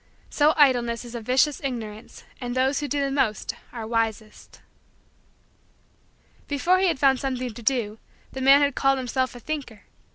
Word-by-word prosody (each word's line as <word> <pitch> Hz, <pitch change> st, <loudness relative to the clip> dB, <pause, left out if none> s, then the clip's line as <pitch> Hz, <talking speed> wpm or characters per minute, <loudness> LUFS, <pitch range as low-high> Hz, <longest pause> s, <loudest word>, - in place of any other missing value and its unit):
So 300 Hz, +1 st, +3 dB
idleness 245 Hz, -5 st, +3 dB
is 240 Hz, -, -10 dB
a 235 Hz, -, -5 dB
vicious 260 Hz, +5 st, +1 dB
ignorance 225 Hz, -5 st, -6 dB, 0.2 s
and 245 Hz, 0 st, -4 dB
those 265 Hz, +2 st, +1 dB
who 295 Hz, -, -3 dB
do 285 Hz, 0 st, -1 dB
the 275 Hz, -1 st, -1 dB
most 250 Hz, -6 st, 0 dB, 0.2 s
are 230 Hz, -3 st, -6 dB
wisest. 225 Hz, -1 st, -3 dB, 1.9 s
Before 340 Hz, +6 st, +2 dB
he 380 Hz, -, +3 dB
had 335 Hz, -, +1 dB
found 265 Hz, -1 st, +3 dB
something 255 Hz, -3 st, -3 dB
to 235 Hz, -, -10 dB
do 225 Hz, -3 st, -1 dB, 0.3 s
the 265 Hz, -, -6 dB
man 275 Hz, +2 st, +6 dB
had 285 Hz, -1 st, +2 dB
called 270 Hz, +1 st, +2 dB
himself 260 Hz, 0 st, -2 dB
a -, -, -9 dB
thinker. 250 Hz, -6 st, -6 dB
255 Hz, 165 wpm, -24 LUFS, 235-280 Hz, 1.9 s, man